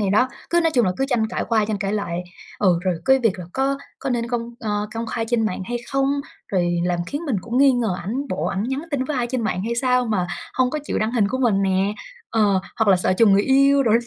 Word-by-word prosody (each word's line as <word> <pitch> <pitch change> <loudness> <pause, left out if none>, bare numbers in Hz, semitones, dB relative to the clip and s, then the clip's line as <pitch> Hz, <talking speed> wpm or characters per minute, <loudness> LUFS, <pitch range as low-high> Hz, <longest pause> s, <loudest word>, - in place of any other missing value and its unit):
Thì 200 -2 +1
đó, 250 +6 +3 0.2
cứ 345 0 +4
nói 330 -1 +2
chung 240 -4 +4
là 185 - +1
cứ 270 - +1
tranh 230 -4 +1
cãi - - -2
qua 220 -2 +3
tranh 210 -1 -2
cãi 200 0 -2
lại. 180 -4 -2 0.4
Ừ, 180 -4 +3
rồi 185 -2 +1
cái 265 0 +5
việc 215 -6 +1
là 180 - -6
có 275 +1 0 0.2
có 270 - -3
nên 235 -1 -1
công, 240 -1 -3
ơ, 210 -1 -2
công 230 0 -3
khai 225 +1 -2
trên 230 -3 +2
mạng 185 -1 -3
hay 240 +3 -3 0.2
không? 275 0 +2 0.4
Rồi 175 -2 +1
làm 175 -1 0
khiến 290 +3 -4
mình 255 - 0
cũng 240 +5 -2
nghi 275 -1 +6
ngờ 230 -7 0
ảnh, 255 +9 -3
bộ 185 - -2
ảnh 195 +1 -1
nhắn 265 +4 -2
tin 270 -2 0
với 290 0 -3
ai 240 -1 0
trên 250 -1 -2
mạng 190 -3 -1
hay 235 +1 -1
sao 250 0 +2
mà 190 -5 0 0.3
hông 255 -1 +2
có 305 - -2
chịu - - -2
đăng 220 +2 -1
hình 210 -5 +2
của 260 - -2
mình 215 -6 +2
nè. 195 +2 +1 0.4
Ờ, 205 -4 +3 0.2
hoặc 220 -2 +2
là 190 - +6
sợ 180 - +1
trùng 205 +1 +5
người 200 +1 +4
yêu 275 +1 +4
đồ. 225 -4 +2
225 Hz, 275 wpm, -22 LUFS, 200-255 Hz, 0.4 s, nghi